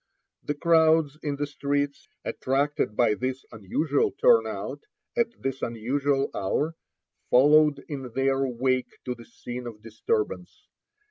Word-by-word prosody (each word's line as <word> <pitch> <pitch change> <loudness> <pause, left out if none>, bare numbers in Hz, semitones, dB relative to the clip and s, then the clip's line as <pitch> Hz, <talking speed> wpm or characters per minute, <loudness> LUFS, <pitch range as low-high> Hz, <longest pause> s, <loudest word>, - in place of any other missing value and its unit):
The 145 - -1
crowds 160 -1 +3
in 145 -2 -2
the 145 +1 -2
streets, 145 0 -2 0.2
attracted 135 -4 0
by 120 -3 +4
this 130 +4 -3
unusual 140 - 0
turnout 465 +4 +2 0.3
at 235 - +3
this 135 0 -3
unusual 135 +5 0
hour, 150 +12 -1 0.5
followed 145 +2 +5
in 135 -4 -6
their 135 0 +2
wake 130 0 -1
to 125 - -2
the 120 -1 -13
scene 120 +1 -7
of 110 -2 -10
disturbance. 415 - -3
135 Hz, 125 wpm, -26 LUFS, 125-150 Hz, 0.5 s, followed